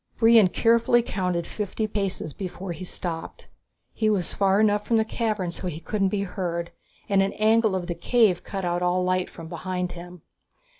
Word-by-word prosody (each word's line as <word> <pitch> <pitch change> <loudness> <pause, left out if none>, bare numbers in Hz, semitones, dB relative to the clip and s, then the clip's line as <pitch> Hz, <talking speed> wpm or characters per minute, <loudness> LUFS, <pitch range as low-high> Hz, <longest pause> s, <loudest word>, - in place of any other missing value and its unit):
Brion 225 -3 +6
carefully 235 +4 +3
counted 180 -5 -2
fifty 210 +3 -3
paces 195 -7 -3
before 185 -1 -6
he 170 +2 -6
stopped. 170 -2 -5 0.5
He 215 -1 +1
was 195 -5 0
far 195 0 +2
enough 210 -1 +3
from 230 - +3
the 220 - +2
cavern 215 -5 -2
so 180 - -6
he 160 -3 -4
couldn't 195 +2 0
be 200 0 -1
heard, 170 -3 -3 0.4
and 195 -1 +3
an 195 +1 0
angle 220 -1 +3
of 180 -2 -2
the 175 - -3
cave 190 +1 +2
cut 195 -2 -4
off 175 0 -1
all 180 +1 +1
light 185 0 0
from 165 -1 -10
behind 180 +1 -3
him. 175 -1 -10
190 Hz, 185 wpm, -25 LUFS, 175-215 Hz, 0.5 s, Brion